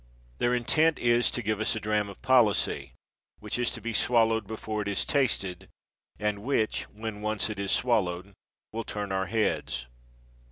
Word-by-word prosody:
Their 120 0 +2
intent 155 +7 +3
is, 120 0 +3
to 125 - -3
give 105 0 -1
us 110 - +1
a - - -2
dram 105 -1 0
of 100 - -12
policy 105 - +3 0.4
which - - -4
is 125 - +3
to - - -6
be 115 0 -3
swallowed 115 -2 +3
before 110 0 -4
it 100 - -4
is 100 - +1
tasted, 105 -10 0 0.5
and 105 -1 -1
which, 110 -1 0
when 105 0 -6
once 110 0 0
it 105 - -6
is 100 -1 -1
swallowed, 100 -5 +1 0.4
will 115 +1 -3
turn 105 -2 -4
our 95 -1 0
heads. 105 - -1
110 Hz, 170 wpm, -28 LUFS, 100-120 Hz, 0.5 s, intent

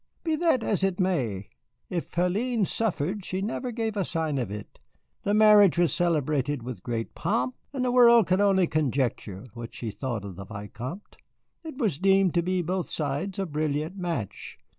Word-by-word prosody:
"Be 320 -2 +1
that 325 -8 +2
as 200 -4 +1
it 195 -1 0
may, 125 - -1 0.4
if 170 -5 -4
Hélène 205 +6 +1
suffered, 195 -2 -1
she 185 +1 -3
never 230 +5 -3
gave 225 -2 -2
a 200 - +1
sign 160 -5 -1
of 120 -6 -2
it. 105 0 -8 0.4
The 205 - +1
marriage 210 -4 +6
was 175 -2 +3
celebrated 150 -5 0
with 120 -6 -6
great 115 0 -4
pomp, 125 +1 -1 0.2
and 265 -3 -2
the 250 - +1
world 235 -3 +7
could 185 +3 +2
only 195 -2 +4
conjecture 130 - -1
what 115 -1 -8
she 115 -3 -4
thought 115 -3 -4
of 95 -3 -8
the 100 - -7
Vicomte. 120 - -8 0.5
It 315 -5 -8
was 205 - 0
deemed 195 -1 +3
on 180 +2 +1
both 180 +2 -2
sides 150 +6 -2
a 195 - -1
brilliant 155 +1 -2
match. 170 - -4
175 Hz, 175 wpm, -27 LUFS, 130-200 Hz, 0.5 s, world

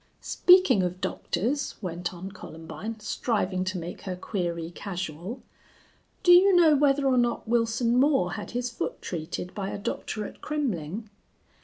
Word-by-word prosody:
"Speaking 360 - +5
of 180 0 -2
doctors," 240 +12 -2
went 175 -2 -4
on 185 +2 -8
Columbine, 195 +4 -8
striving 200 -4 -1
to 185 0 -2
make 170 +1 -6
her 185 -2 -4
query 175 -3 -3
casual, 180 - -5 0.8
"do 355 - +6
you 370 +2 +7
know 325 -4 +6
whether 280 0 +3
or 260 -2 +4
not 240 -1 0
Wilson 230 +1 +2
Moore 265 -10 +3
had 205 +1 -5
his 245 0 -2
foot 235 - -4
treated 175 +1 -5
by 195 -2 -3
a - - -4
doctor 210 +1 -4
at - - -10
Kremmling?" 220 - -3
210 Hz, 150 wpm, -27 LUFS, 180-255 Hz, 0.8 s, you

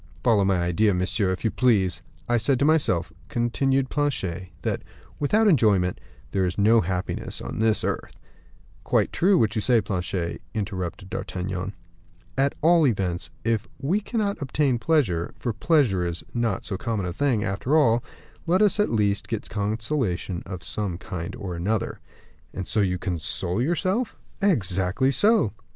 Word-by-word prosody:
"Follow 110 -5 +4
my 95 -2 +2
idea, 90 +4 +2
monsieur, 95 +2 0
if 95 - -4
you 110 - +2
please. 95 -8 +2 0.3
I 120 - +3
said 120 +4 +2
to 140 - +2
myself," 95 - +2 0.2
continued 130 +3 +1
Planchet, 95 - -1
"that, - - -1 0.4
without 210 +10 +3
enjoyment, 105 - +3 0.3
there 95 - +1
is 90 0 -1
no 110 +3 +5
happiness 90 +1 -3
on - - -6
this 110 -1 +2
earth." - - -3 0.7
"Quite - - +1
true, 190 +2 +4
what 110 -7 +2
you 110 - 0
say, 120 +1 +4
Planchet," 90 -3 -3
interrupted 95 -3 -4
D'Artagnan. 95 +1 -4 0.6
"At 135 +1 +1
all 165 -2 +5
events, 95 -7 -1
if 115 -1 0
we 160 +10 0
cannot 205 -5 -2
obtain 135 -2 +1
pleasure 115 - +1
for 120 - -2
pleasure 120 - +2
is 85 -1 -3
not 115 -5 -1
so 95 - -3
common 105 -1 -2
a 90 - -3
thing, 120 -1 +1
after 110 +9 +1
all 120 -6 +4 0.4
let 185 +5 +4
us, 210 0 +3
at 210 - +3
least, 105 -3 +1
get 115 -3 -4
consolations 105 - -1
of 90 -2 -6
some 100 -5 -2
kind 85 -2 -6
or 95 -4 -5
another." 100 +5 -1 0.6
"And 95 - -4
so - - 0
you 90 -2 +1
console 90 +1 -2
yourself?" 185 - 0 0.2
"Exactly 100 - +2
so." 205 - +3
110 Hz, 155 wpm, -25 LUFS, 95-135 Hz, 0.7 s, no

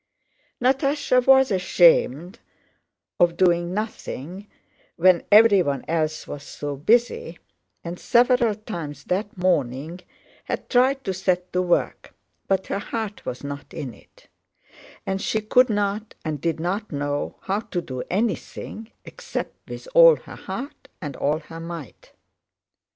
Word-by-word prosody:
Natásha 270 0 +2
was 265 -2 +6
ashamed 175 - +3 0.8
of 170 -1 +3
doing 175 -1 +2
nothing 195 - -5 0.5
when 180 0 +5
everyone 200 -10 +5
else 155 -1 -1
was 145 - -7
so 145 0 -6
busy, 195 - +1 0.5
and 175 +1 -6
several 240 -2 +3
times 165 -10 -7
that 200 +2 -2
morning 160 -2 0 0.5
had - - -4
tried 265 +2 +3
to 190 - -2
set 185 -1 -1
to 180 - +2
work, 175 -1 -1 0.3
but 190 -1 +1
her 195 - -2
heart 215 0 -5
was 125 - -5
not 140 0 -7
in 130 -5 -5
it, - - -22 0.8
and 190 0 -2
she 220 - 0
could 250 +4 +3
not 205 +1 -2
and 150 -3 -3
did 165 -2 -1
not 195 +6 -3
know 145 0 -2
how 195 +2 -1
to 205 -5 -4
do 130 -7 -5
anything 220 +2 -3 0.2
except - - -6
with - - -8
all - - +8
her - - -12
heart 280 +2 -7
and 145 -6 -6
all 145 +4 0
her 165 +1 -10
might. 165 -5 -9
185 Hz, 135 wpm, -23 LUFS, 160-220 Hz, 0.8 s, all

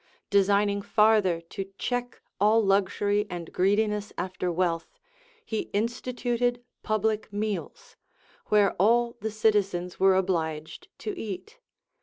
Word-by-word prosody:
* - - -51
Designing 200 +1 +2
farther 210 -5 +3
to 195 +3 -7
check 245 0 -3 0.2
all 210 +3 +5
luxury 205 +1 +1
and 170 -2 -7
greediness 210 +2 +1
after 185 -1 -2
wealth, 170 -1 -1 0.5
he 220 - -3
instituted 245 +2 -1 0.2
public 215 0 -1
meals, 205 -3 -4 0.5
where 205 -2 +4
all 235 +3 +3
the 220 - -2
citizens 200 -5 0
Λvere 190 0 +4
obliged 160 -5 -2
to 420 - -5
eat. 345 - -7
205 Hz, 115 wpm, -27 LUFS, 190-220 Hz, 0.5 s, all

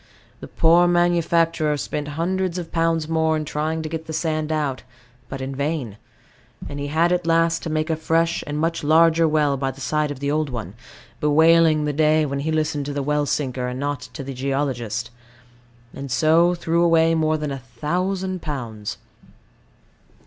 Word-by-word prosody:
The - - -9
poor 170 +2 +4
manufacturer 170 -3 +2
spent 145 +1 -4
hundreds 185 +1 -1
of 170 -2 -6
pounds 165 -1 0
more 160 -1 +1
in 155 - -3
trying 155 +2 -2
to - - -3
get 160 0 -6
the 160 - -5
sand 155 -1 -1
out, 145 -4 -1 0.5
but 135 0 -6
in 135 +1 -4
vain; 140 -7 -3 0.7
and 145 - -6
he 145 - -3
had 165 +4 +2
at 180 -1 0
last 165 0 +2
to - - -5
make 155 +1 -1
a - - +1
fresh 165 +1 0
and 145 0 -3
much 165 +1 -1
larger 165 +2 +4
well 150 -2 +2
by 135 0 -1
the 135 - -9
side 150 +3 0
of 145 - -5
the 140 0 -1
old 155 -1 0
one, 110 -7 -6 0.5
bewailing 160 +1 +4
the 150 - -1
day 155 +1 +3
when 140 -1 -3
he 155 +3 -2
listened 155 -2 -1
to 145 - -3
the 140 -1 -2
well 150 +1 0
sinker 130 -4 -2
and 125 +1 -5
not 145 -1 -2
to 135 - -6
the 135 0 -6
geologist, 130 -4 -2 0.8
and 140 0 -7
so 160 +7 +3
threw 170 0 0
away 165 -1 +4
more 155 -1 +1
than 150 -1 -4
a 135 - -4
thousand 180 +9 -3
pounds. 115 -9 -5
155 Hz, 185 wpm, -22 LUFS, 140-165 Hz, 0.8 s, poor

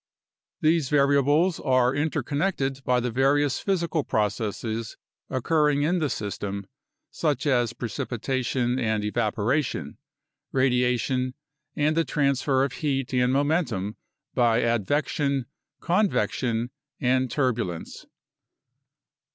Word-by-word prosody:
These 155 -3 +2
variables 145 +4 +3
are 130 -2 +2
interconnected 145 -1 -1
by 125 -1 +2
the 125 0 -2
various 135 +3 +2
physical 170 -5 0
processes 110 +1 -2 0.3
occurring 150 +2 +2
in 175 +4 +2
the 155 -3 0
system, 100 -3 -4 0.5
such 150 -3 -1
as 120 -5 +2
precipitation 125 +2 -2
and 110 -3 0
evaporation, 110 - -1 0.5
radiation, 125 0 +1 0.4
and 150 +1 +1
the 165 - +3
transfer 140 -3 +1
of 135 -2 -1
heat 135 -3 -2
and 125 0 +3
momentum 140 - 0 0.4
by 120 -2 +3
advection, 135 +4 0 0.4
con 195 +4 +2
vection, 115 +1 -1 0.3
and 130 0 +2
turbulence. 115 - -2
130 Hz, 100 wpm, -25 LUFS, 120-145 Hz, 0.5 s, variables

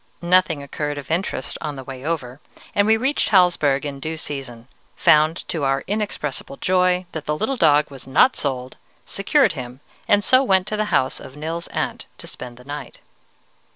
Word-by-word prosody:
"Nothing 175 -4 +3
occurred 145 +1 -4
of 145 0 -7
interest 175 +5 -2
on 150 -2 -4
the 135 - -7
way 130 0 -8
over, 145 -5 -3 0.3
and 205 0 +3
we 220 0 +5
reached 265 +5 0
Hallsberg 165 -7 +3
in 140 -1 -5
due 160 +3 -4
season, 130 -6 -6 0.3
found 155 +2 +3
to 160 -4 -2
our 135 0 +1
inexpressible 195 -10 -3
joy 180 0 +2
that 160 -2 -6
the 150 0 0
little 245 - -1
dog 150 - +3
was 135 -2 -10
not 205 - +4
sold, 130 -3 -3 0.3
secured 270 +9 +2
him, 125 -3 -7 0.3
and 205 0 +4
so 255 +4 +5
went 190 -8 +3
to 215 - -3
the 215 0 0
house 130 -10 +1
of 130 +2 -11
Nils's 165 +3 -4
aunt - - -3
to - - -10
spend 125 -1 -8
the 125 - -14
night. 145 +1 -7
150 Hz, 185 wpm, -22 LUFS, 135-185 Hz, 0.3 s, we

